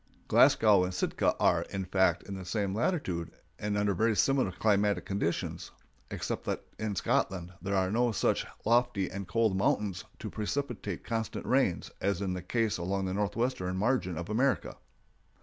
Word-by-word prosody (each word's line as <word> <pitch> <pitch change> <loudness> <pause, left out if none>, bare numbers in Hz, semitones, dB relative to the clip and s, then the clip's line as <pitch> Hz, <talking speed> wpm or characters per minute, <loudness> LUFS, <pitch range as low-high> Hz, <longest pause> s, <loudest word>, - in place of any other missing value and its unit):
Glasgow 90 - +5
and 90 - -1
Sitka - - +1
are, - - +3
in 95 -1 -3
fact, 95 0 +2
in 100 - -7
the 95 -1 -6
same 95 +1 -1
latitude, 100 - -1 0.3
and 105 0 -1
under 105 -1 +2
very 110 +4 +2
similar 135 -4 +2
climatic 105 +1 +1
conditions, 95 -4 -2 0.4
except - - -3
that - - -2 0.2
in 105 -2 -2
Scotland 90 -1 0
there 100 0 -1
are 95 -1 +1
no 120 +2 +2
such 110 - 0 0.2
lofty 120 -4 +2
and 100 -1 -5
cold 110 +1 +2
mountains 95 -1 0
to - - -6
precipitate 110 - -3
constant 115 -1 -3
rains 130 -10 +1
as 100 -2 0
is 95 -2 -1
the 90 - -4
case 110 +2 0
along 95 +2 -1
the 95 - -2
northwestern 105 -2 -1
margin 100 -5 0
of 85 +1 -4
America. 125 +5 0
100 Hz, 165 wpm, -30 LUFS, 95-115 Hz, 0.4 s, Glasgow